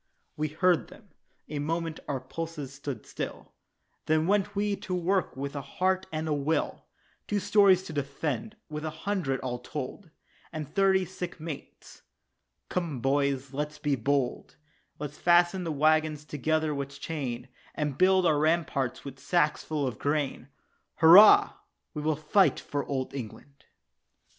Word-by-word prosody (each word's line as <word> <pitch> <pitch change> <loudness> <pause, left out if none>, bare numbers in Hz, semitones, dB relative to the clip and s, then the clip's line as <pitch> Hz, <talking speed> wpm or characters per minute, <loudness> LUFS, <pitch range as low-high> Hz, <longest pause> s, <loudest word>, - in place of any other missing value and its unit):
We 155 +1 -1
heard 160 - +2
them, - - -16 0.4
a 150 -1 -4
moment 165 +2 -2
our 140 -2 -2
pulses 150 +1 -6
stood 135 -4 -6
still, - - -6 0.5
Then 155 0 +3
went 205 +2 +1
we 205 0 +1
to 185 - -4
work 180 -3 0
with 140 +1 -4
a 140 - -3
heart 185 +7 -1
and 155 0 -3
a 155 - +1
will 145 +2 -1 0.4
Two 205 - 0
stores 200 -2 +5
to 160 - -8
defend 145 - -3
with 150 -1 -6
a 160 - -2 0.2
hundred, 175 -10 0
all 125 -2 -3
told, 150 +7 -6 0.4
And 155 -2 -5
thirty 190 +1 +3
sick 180 0 -7
mates. 155 -2 -9 0.7
"Come, 165 -7 -2
boys, 135 0 0
let's 150 +2 -3
be 145 -2 0
bold; 135 +1 -1 0.4
Let's 145 0 -7
fasten 175 +1 +4
the 165 - -2
waggons 155 0 +2
together 155 +2 0
with 140 0 -5
chain, 135 -6 -4 0.3
And 150 -3 -2
build 185 +3 +4
up - - +5
our 150 - +1
ramparts 155 -6 0
with 135 -1 -8
sacks 155 -2 +1
full 150 -3 -2
of 125 -5 -4
grain." 145 -3 -1 0.5
"Hurrah, 205 - +8 0.4
we 150 - -4
will 155 +1 +1
fight 155 +6 +3
for 145 -1 -3
Old 130 -2 -3
England." 140 +2 -9
155 Hz, 155 wpm, -28 LUFS, 140-175 Hz, 0.7 s, Hurrah